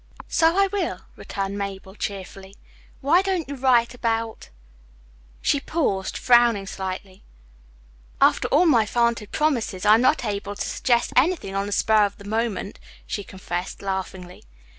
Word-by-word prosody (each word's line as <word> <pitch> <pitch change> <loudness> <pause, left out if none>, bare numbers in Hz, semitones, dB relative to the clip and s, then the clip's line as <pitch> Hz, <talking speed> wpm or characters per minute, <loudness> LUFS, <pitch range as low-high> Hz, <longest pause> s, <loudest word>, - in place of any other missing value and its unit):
"So 330 +2 +3
I 395 - +5
will," 395 0 -3
returned 195 0 -4
Mabel 195 -1 -6
cheerfully. 195 -1 -7 0.5
"Why 315 +7 +4
don't 375 -5 -1
you 285 - -5
write 250 -3 +2
about 225 - -3 0.5
" - - -29
She 285 - +2
paused, 260 - -1
frowning 240 -5 +4
slightly. 190 0 -6 1.0
"After - - +4
all 310 +6 +4
my 235 -9 +4
vaunted 235 -2 0
promises 245 -11 -1
I'm 215 +2 +6
not 255 0 +2
able 205 -1 -3
to - - -3
suggest 240 -2 +1
anything 285 - +2
on 195 +1 -1
the - - -5
spur 215 +1 +3
of 200 - -13
the 200 - -13
moment," 220 -1 -2 0.3
she 205 - -4
confessed 185 -1 -6
laughingly. 190 -2 -5
215 Hz, 145 wpm, -23 LUFS, 195-255 Hz, 1.0 s, I'm